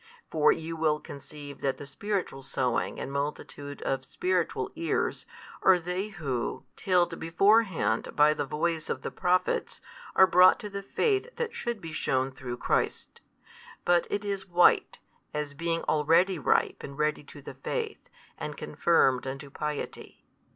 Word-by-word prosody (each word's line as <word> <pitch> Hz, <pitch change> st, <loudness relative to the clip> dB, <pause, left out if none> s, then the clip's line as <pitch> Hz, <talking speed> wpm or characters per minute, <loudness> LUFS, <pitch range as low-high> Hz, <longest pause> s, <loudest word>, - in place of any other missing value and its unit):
For 155 Hz, -2 st, +5 dB
you 165 Hz, +1 st, -3 dB
will 155 Hz, -2 st, +1 dB
conceive 145 Hz, 0 st, -10 dB
that 135 Hz, -1 st, 0 dB
the 145 Hz, -, -8 dB
spiritual 185 Hz, -1 st, -3 dB
sowing 125 Hz, -2 st, -1 dB
and 135 Hz, -, -5 dB
multitude 145 Hz, 0 st, -4 dB
of 135 Hz, -1 st, -1 dB
spiritual 365 Hz, -, -1 dB
ears, 335 Hz, -, -1 dB, 0.3 s
are 190 Hz, -1 st, +6 dB
they 180 Hz, +3 st, -3 dB
who, 140 Hz, -, -3 dB
tilled 175 Hz, -4 st, +1 dB
beforehand 185 Hz, -, +2 dB
by 150 Hz, 0 st, +6 dB
the 145 Hz, -, -2 dB
voice 160 Hz, +3 st, -2 dB
of -, -, -3 dB
the -, -, -4 dB
Prophets, 180 Hz, +1 st, 0 dB, 0.4 s
are 190 Hz, -, +8 dB
brought 185 Hz, 0 st, +6 dB
to 210 Hz, -2 st, -6 dB
the 200 Hz, 0 st, -4 dB
faith 400 Hz, -, 0 dB
that 470 Hz, -1 st, -3 dB
should 235 Hz, -, -3 dB
be 165 Hz, -4 st, -8 dB
shewn 135 Hz, -3 st, 0 dB
through 125 Hz, -2 st, -6 dB
Christ. -, -, -1 dB, 0.6 s
But 175 Hz, -1 st, +3 dB
it 205 Hz, 0 st, -2 dB
is 200 Hz, -1 st, -3 dB
white, 175 Hz, 0 st, +4 dB, 0.4 s
as 150 Hz, -1 st, -3 dB
being 165 Hz, +2 st, -2 dB
already 165 Hz, +4 st, +3 dB
ripe 135 Hz, -, +1 dB
and 140 Hz, 0 st, -8 dB
ready 150 Hz, -1 st, 0 dB
to 145 Hz, -, -12 dB
the -, -, -8 dB
faith, 450 Hz, -3 st, -4 dB, 0.3 s
and -, -, -5 dB
confirmed 135 Hz, -7 st, +2 dB
unto 135 Hz, +1 st, -6 dB
piety. 150 Hz, 0 st, -5 dB
160 Hz, 150 wpm, -28 LUFS, 140-190 Hz, 0.6 s, are